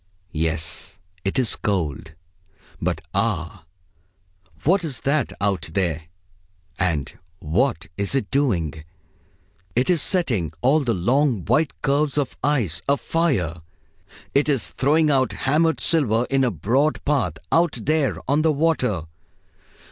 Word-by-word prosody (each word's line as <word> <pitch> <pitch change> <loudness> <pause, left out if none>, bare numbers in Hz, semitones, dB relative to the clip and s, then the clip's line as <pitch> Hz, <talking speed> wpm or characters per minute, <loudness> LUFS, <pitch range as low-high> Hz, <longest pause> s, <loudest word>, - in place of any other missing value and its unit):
Yes, 80 0 -2 0.3
it 95 - -2
is 125 -4 +3
cold. 80 -5 -2 0.7
But - - -1
ah! 95 -4 -1 1.0
what 185 +5 +3
is 145 -7 -3
that 140 -2 0
out 100 -1 0
there, 85 -5 -1 0.7
and 85 -7 -1 0.2
what 85 - 0
is 100 +6 0
it 120 -7 -1
doing? 85 - 0 0.9
It 125 +8 +2
is 170 -4 +2
setting 115 - +1
all 140 +5 +4
the 120 -7 0
long 120 - +1
white 150 +8 +1
curves 145 +1 +1
of 140 -3 -1
ice 115 - +1
afire. 140 - 0 0.7
It 145 +2 +2
is 135 -5 0
throwing 155 +4 +2
down 135 -3 +3
hammered 160 +4 +1
silver 125 -8 +2
in 135 0 +3
a 125 - +3
broad 125 - 0
path, 140 - +1 0.2
out 170 +1 +3
there 155 -3 +1
on 145 +3 +2
the 160 0 +3
water. 140 - +1
130 Hz, 125 wpm, -22 LUFS, 90-150 Hz, 1.0 s, all